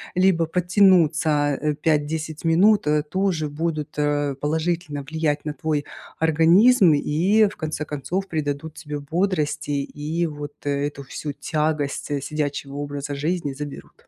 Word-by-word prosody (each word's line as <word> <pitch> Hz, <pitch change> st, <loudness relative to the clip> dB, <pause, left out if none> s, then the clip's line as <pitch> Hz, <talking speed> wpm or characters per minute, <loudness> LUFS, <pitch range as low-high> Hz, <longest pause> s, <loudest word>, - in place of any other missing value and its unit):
либо 180 Hz, -2 st, +3 dB
подтянуться, 165 Hz, -4 st, +3 dB
а, 150 Hz, +1 st, -1 dB
5-10 155 Hz, +1 st, -1 dB
минут 190 Hz, +5 st, +4 dB, 0.3 s
тоже 185 Hz, -6 st, 0 dB
будут, 155 Hz, 0 st, -3 dB
а, 145 Hz, -1 st, 0 dB
положительно 155 Hz, +1 st, -2 dB
влиять 150 Hz, 0 st, -1 dB
на 150 Hz, -, -2 dB
твой 155 Hz, -2 st, -2 dB, 0.3 s
организм 170 Hz, +5 st, +5 dB
и, 180 Hz, +9 st, +3 dB
в -, -, -12 dB
конце 155 Hz, -1 st, -3 dB
концов, 160 Hz, +7 st, -3 dB
придадут 155 Hz, -1 st, -3 dB
тебе 150 Hz, -1 st, -6 dB
бодрости 155 Hz, 0 st, -1 dB
и 150 Hz, +4 st, -2 dB
вот 145 Hz, -1 st, -7 dB
эту 140 Hz, 0 st, -2 dB
всю 145 Hz, +2 st, -6 dB
тягость 145 Hz, -1 st, -2 dB
сидячего 145 Hz, -1 st, -3 dB
образа 145 Hz, 0 st, -4 dB
жизни 150 Hz, 0 st, -2 dB
заберут. 145 Hz, +1 st, -9 dB
155 Hz, 125 wpm, -23 LUFS, 145-170 Hz, 0.3 s, организм